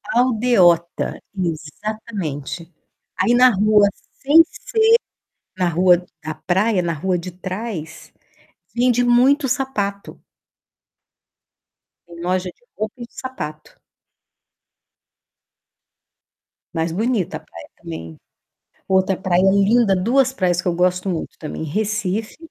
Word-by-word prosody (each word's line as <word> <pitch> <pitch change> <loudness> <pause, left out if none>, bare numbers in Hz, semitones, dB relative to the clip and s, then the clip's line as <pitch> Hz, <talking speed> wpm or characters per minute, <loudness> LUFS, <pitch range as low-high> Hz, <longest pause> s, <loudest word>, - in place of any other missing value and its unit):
Aldeota, 220 -9 +2 0.2
exatamente. 170 -1 -5 0.5
Aí 240 - +3
na 250 +1 +7
rua, 210 0 +4 0.3
sem 300 +4 +7
ser 465 +7 -11 0.8
na 180 -2 +1
rua 180 +1 +3 0.2
da 155 +1 -4
praia, 190 +1 +1
na 170 -1 -1
rua 180 +4 -1
de 180 +1 -6
trás, 185 -3 -7 0.6
vende 245 0 +2
muito 265 +4 +4
sapato. 215 -6 -3 1.9
Tem 170 -1 -12
loja 185 +1 -1
de 210 - -17
roupa 215 +1 -3
e - - -5
de 235 - -26
sapato. 155 -13 -7 2.9
Mas 165 0 -2
bonita 195 -4 -1
a - - -13
praia 85 - -13
também. 80 -1 -8 0.7
Outra 190 0 +2
praia 185 -1 +1
linda, 200 +2 +4
2 250 +7 +2
praias 180 -8 0
que - - -1
eu 175 - 0
gosto 180 +2 +1
muito 170 -4 -4
também: 155 0 -6
Recife, 210 +4 -2
190 Hz, 110 wpm, -20 LUFS, 170-230 Hz, 2.9 s, na